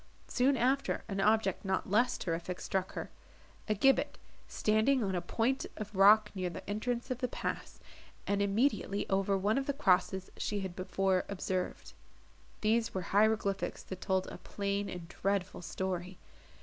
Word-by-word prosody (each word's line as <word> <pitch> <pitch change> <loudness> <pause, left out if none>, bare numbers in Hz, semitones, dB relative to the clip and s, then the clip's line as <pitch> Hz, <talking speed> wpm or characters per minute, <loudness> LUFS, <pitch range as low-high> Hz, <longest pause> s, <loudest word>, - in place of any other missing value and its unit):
Soon 265 +2 +2
after 265 +3 +1
an 195 -2 -2
object 220 +3 +2
not 190 -1 -1
less 240 +5 +2
terrific 175 +1 -3
struck 190 -1 -2
her,—a 215 - -7
gibbet 270 +7 +3 0.3
standing 220 +4 +2
on 195 -2 -1
a 175 - 0
point 230 +9 0
of 210 -1 -6
rock 210 +2 +6
near 185 -2 -2
the - - -9
entrance 240 +5 -2
of 250 - -2
the 250 - 0
pass, - - -5 0.5
and 200 0 +1
immediately 200 0 +1
over 195 0 +2
one 210 +6 +2
of 270 - -4
the 280 - +1
crosses 190 -5 +2
she 205 -1 -2
had 190 -2 -5
before 190 0 +1
observed. 185 -2 -3 0.7
These 225 +1 +1
were 190 - 0
hieroglyphics 205 -2 +2
that 190 -1 -8
told 190 -1 +1
a - - -8
plain 200 0 -2
and 175 -2 -7
dreadful 195 0 -2
story. 185 0 -4
200 Hz, 155 wpm, -32 LUFS, 190-220 Hz, 0.7 s, rock